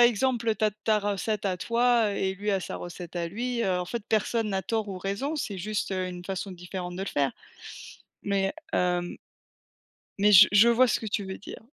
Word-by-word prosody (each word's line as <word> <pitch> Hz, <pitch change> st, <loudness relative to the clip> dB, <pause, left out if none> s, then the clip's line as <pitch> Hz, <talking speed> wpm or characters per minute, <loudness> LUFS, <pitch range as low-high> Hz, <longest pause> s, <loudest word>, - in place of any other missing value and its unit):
exemple, 240 Hz, 0 st, +3 dB
heu, 220 Hz, -, +3 dB
tu 215 Hz, -, -1 dB
as 215 Hz, -, +3 dB
tu 215 Hz, +2 st, -5 dB
as 215 Hz, -, +5 dB
recette 205 Hz, +1 st, -2 dB
à 185 Hz, -2 st, 0 dB
toi, 235 Hz, +2 st, +2 dB
heu -, -, -4 dB
et 190 Hz, 0 st, -1 dB
lui 205 Hz, +2 st, -2 dB
a 195 Hz, -2 st, +1 dB
sa -, -, -5 dB
recette 175 Hz, 0 st, -8 dB
à 170 Hz, -1 st, -1 dB
lui, 235 Hz, +4 st, -2 dB
heu, 185 Hz, -3 st, +1 dB
en 180 Hz, -, -2 dB
fait 230 Hz, +4 st, -4 dB
personne 220 Hz, 0 st, +1 dB
n'a 190 Hz, -1 st, -1 dB
tort 220 Hz, +2 st, -2 dB
ou 190 Hz, -1 st, -5 dB
raison. 200 Hz, -, -2 dB
C'est 205 Hz, -9 st, -3 dB
juste, 205 Hz, +1 st, -2 dB
heu, 185 Hz, -1 st, -1 dB
une 180 Hz, 0 st, -8 dB
façon 195 Hz, 0 st, -4 dB
différente 180 Hz, 0 st, -6 dB
de 190 Hz, -, -3 dB
le 195 Hz, -, -3 dB
faire. 140 Hz, -3 st, 0 dB, 0.9 s
Mais, 195 Hz, -1 st, 0 dB, 0.2 s
hem 180 Hz, -1 st, 0 dB, 1.0 s
mais 205 Hz, +1 st, +4 dB
je 200 Hz, +2 st, +10 dB
je 210 Hz, +3 st, +7 dB
vois 245 Hz, +2 st, +5 dB
ce -, -, +1 dB
que 220 Hz, -, -5 dB
tu 205 Hz, -1 st, -2 dB
veux 190 Hz, 0 st, -6 dB
dire. 210 Hz, -, -10 dB
200 Hz, 230 wpm, -27 LUFS, 185-225 Hz, 1.0 s, je